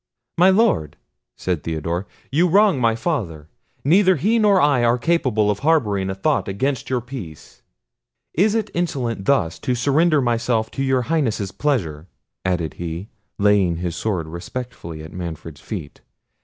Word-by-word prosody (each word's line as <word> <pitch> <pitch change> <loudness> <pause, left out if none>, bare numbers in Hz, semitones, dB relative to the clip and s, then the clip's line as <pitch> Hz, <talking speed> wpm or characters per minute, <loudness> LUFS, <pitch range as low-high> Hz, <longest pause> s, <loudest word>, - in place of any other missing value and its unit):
"My 180 +3 +5
Lord," 190 - +2 0.4
said 90 -4 -2
Theodore, 85 +4 -3 0.2
"you 165 +6 +3
wrong 195 -5 +4
my 115 -1 +3
father: 95 - -3 0.3
neither 185 +5 +5
he 215 - +2
nor 205 -3 +4
I 140 -6 +3
are 120 +1 +3
capable 120 -8 +1
of 100 - -3
harbouring 110 -12 +1
a 95 - -3
thought 95 - 0
against 125 +7 -2
your 125 -2 0
peace. 115 - -10 0.7
Is 205 +6 +2
it 220 -2 -1
insolence 135 - -2
thus 130 -13 +1
to 125 - -1
surrender 150 +6 +3
myself 115 -3 0
to 135 - -3
your 130 -2 +1
Highness's 115 - -1
pleasure?" 90 - -2 0.4
added 90 -4 -1
he, 85 +5 -5 0.3
laying 100 -4 +3
his 85 0 -3
sword 95 -6 -2
respectfully 85 -1 -7
at 80 0 -10
Manfred's 80 -4 -7
feet. 85 -10 -7
115 Hz, 150 wpm, -21 LUFS, 90-150 Hz, 0.7 s, My